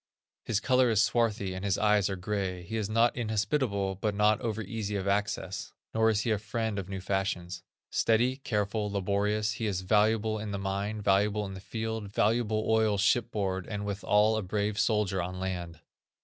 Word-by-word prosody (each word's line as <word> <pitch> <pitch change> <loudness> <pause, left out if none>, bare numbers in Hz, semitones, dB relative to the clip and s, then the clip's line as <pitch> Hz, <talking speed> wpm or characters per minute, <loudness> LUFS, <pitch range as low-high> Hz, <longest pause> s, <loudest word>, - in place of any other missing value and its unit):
His 105 -3 +1
color 130 +1 +3
is 110 -3 +2
swarthy, 110 -4 +1
and 95 +1 -6
his 100 -2 +1
eyes 105 -2 +3
are 95 - -2
gray. 95 -1 -3
He 100 +6 -6
is 110 -2 -1
not 115 +2 +3
inhospitable, 110 -3 0
but 105 -2 0
not 105 +1 +3
over 110 -2 -2
easy 105 0 -4
of 100 -1 -2
access; 100 -2 -2 0.2
nor 110 0 +3
is 110 -1 +2
he 115 - -1
a 105 - +1
friend 110 0 -2
of 95 -1 -6
new 95 -1 -4
fashions. 90 -2 -2 0.3
Steady, 120 +3 +2
careful, 105 -4 -1
laborious, 105 +2 0
he 110 0 -3
is 95 -3 -1
valuable 110 +2 +2
in 105 0 -5
the 100 - -3
mine, 100 +2 -3
valuable 105 +1 +2
in 95 - -6
the 95 - -7
field, 110 0 -4
valuable 110 +1 +1
oil 110 -2 +3
shipboard, 100 -3 0
and, 105 -2 -4
withal, 105 +2 +2
a - - 0
brave 100 +2 -1
soldier 105 -4 +1
on 90 +1 -5
land. 90 -3 -4
105 Hz, 185 wpm, -29 LUFS, 95-110 Hz, 0.3 s, color